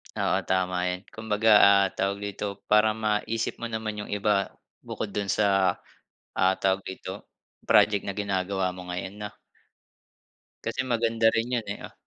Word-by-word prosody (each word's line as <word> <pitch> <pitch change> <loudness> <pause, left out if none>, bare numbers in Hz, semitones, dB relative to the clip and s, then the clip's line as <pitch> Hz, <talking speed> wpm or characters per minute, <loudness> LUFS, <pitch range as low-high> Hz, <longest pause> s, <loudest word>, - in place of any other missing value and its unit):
Oo, - - +1
tama 95 -1 +1
'yan. 90 0 -2
Kumbaga, 110 0 0 0.2
ah, 100 0 +6
tawag 100 +1 -2
dito, 100 0 -5
para 105 0 +5
maisip 110 +1 -1
mo 120 - -3
naman 110 -2 -4
'yung 105 - -7
iba 100 -1 +1 0.3
bukod 100 - -5
dun 100 0 -2
sa, 95 -3 +2 0.6
ah, 95 +1 +3
tawag 95 0 +1
dito, 95 0 -8 0.4
project 105 -2 +5
na 100 - -4
ginagawa 95 -2 -1
mo 90 0 -10
ngayon, 90 +2 -5
'no? 105 - -3 1.4
Kasi - - -1
maganda 115 -2 +2
rin 115 +2 -1
'yun 120 -3 -1
eh, 100 - -4
ah, - - -13
100 Hz, 155 wpm, -26 LUFS, 95-110 Hz, 1.4 s, ah